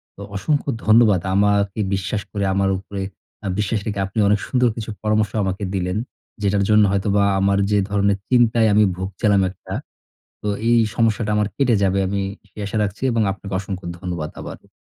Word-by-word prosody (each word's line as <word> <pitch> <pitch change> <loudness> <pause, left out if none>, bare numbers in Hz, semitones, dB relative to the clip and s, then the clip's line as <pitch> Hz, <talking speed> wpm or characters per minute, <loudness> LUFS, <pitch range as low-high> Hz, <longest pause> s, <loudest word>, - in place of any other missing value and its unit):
তো - - -12
অসংখ্য 145 +8 0 0.2
ধন্যবাদ 110 -4 +5
আমাকে 100 0 +2
বিশ্বাস 95 +2 -1
করে 100 -2 -1
আমার 95 0 +2
উপরে 100 +1 -6 0.4
আ - - -1
বিশ্বাস 105 +1 0
রেখে 100 -2 -2
আপনি 95 +3 -4
অনেক 105 0 +3
সুন্দর 125 -1 +2
কিছু 110 0 -5
পরামর্শ 105 -2 +1
আমাকে 95 +1 -2
দিলেন। 90 0 -1 0.4
যেটার 100 -1 +2
জন্য 105 0 +6
হয়তোবা 100 +1 +2 0.2
আমার 100 +1 +2
যে 105 - +4
ধরনের 100 -1 +2
চিন্তায় 120 -2 +4
আমি 105 +1 +5
ভুগছিলাম 95 +2 +1
একটা, 95 - -10 0.7
তো 105 - -2 0.2
এই 120 - +5 0.2
সমস্যাটা 115 -2 +1
আমার 105 -1 +1
কেটে 130 -4 +3
যাবে। 95 0 +2
আমি 100 +1 -1 0.3
সেই 105 - -11
আশা 100 - -4
রাখছি 100 +2 -4
এবং 115 -1 +2
আপনাকে 100 +1 -7
অসংখ্য 95 -2 -6
ধন্যবাদ 85 -4 -4
আবার। - - -9
100 Hz, 175 wpm, -21 LUFS, 95-110 Hz, 0.7 s, জন্য